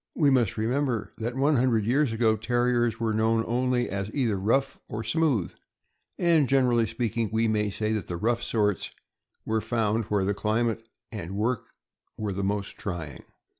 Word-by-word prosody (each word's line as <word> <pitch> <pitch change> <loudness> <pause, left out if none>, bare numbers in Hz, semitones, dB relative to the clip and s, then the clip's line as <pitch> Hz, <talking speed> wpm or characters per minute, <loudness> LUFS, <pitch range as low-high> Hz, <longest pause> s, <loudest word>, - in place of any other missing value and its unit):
We 145 -4 +4
must 120 -7 +2
remember 120 +1 -1
that 120 +2 -3
one 140 +2 +3
hundred 120 -4 +2
years 135 +3 +2
ago 110 -1 +2
Terriers 120 +1 +1
were 115 -1 0
known 110 +1 +2
only 125 +1 +1
as 100 0 -3
either 120 -7 +1
rough 115 +8 0
or 110 +1 -4
smooth; 135 - +1 0.6
and, 165 -7 +3
generally 125 -4 +3
speaking, 115 0 -2
we 110 +1 +2
may 105 -1 +1
say 110 +2 -2
that 105 -4 -3
the 85 - -4
rough 115 +5 0
sorts 105 -3 0 0.6
were 110 0 0
found 110 -1 0
where 100 -2 0
the 100 - +1
climate 115 +2 -1 0.2
and 100 -3 -5
work 115 +2 -1 0.5
were 105 -2 -2
the 100 +1 -3
most 100 +1 -2
trying. 80 -9 -6
115 Hz, 170 wpm, -27 LUFS, 105-125 Hz, 0.6 s, We